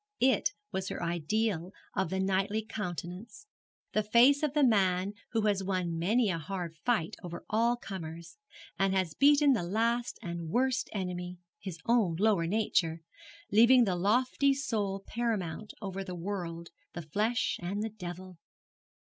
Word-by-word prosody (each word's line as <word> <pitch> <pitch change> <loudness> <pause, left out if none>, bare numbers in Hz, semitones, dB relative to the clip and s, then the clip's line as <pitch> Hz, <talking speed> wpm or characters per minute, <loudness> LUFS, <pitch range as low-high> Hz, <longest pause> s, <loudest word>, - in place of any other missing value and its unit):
It 255 -5 +4 0.2
was 190 0 -3
her - - -4
ideal 175 +2 -1 0.2
of 190 - 0
the 190 - -2
knightly 195 +3 0
countenance, 195 - -6 0.5
the 215 - +2
face 240 +7 +5
of 300 -2 -1
the 295 - +4
man 195 -5 +3 0.2
who 225 - +2
has 205 -2 +1
won 180 -3 -1
many 210 +5 +2
a 165 - -2
hard 175 0 -5
fight 170 0 0
over 175 -1 -7
all 230 +3 +3
comers, 170 - -8 0.4
and 195 0 +2
has 185 -4 0
beaten 285 0 +5
that 175 -8 -1
last 230 +5 0
and 170 -3 -5
worst 255 +6 +1
enemy, 180 -2 -4 0.2
his 185 -4 -6
own 225 -8 +3
lower 195 -3 +2
nature, 170 -5 +1 0.5
leaving 235 +4 +7
the 190 -5 +1
lofty 250 +8 +2
soul 205 -7 -2
paramount 215 -4 -2
over 195 0 -4
the 185 -2 -6
world, 170 -2 -5 0.2
the 175 - -6
flesh, 215 +9 0
and 195 +4 -2
the 220 - -2
devil. 180 -3 -8
195 Hz, 150 wpm, -30 LUFS, 175-225 Hz, 0.5 s, leaving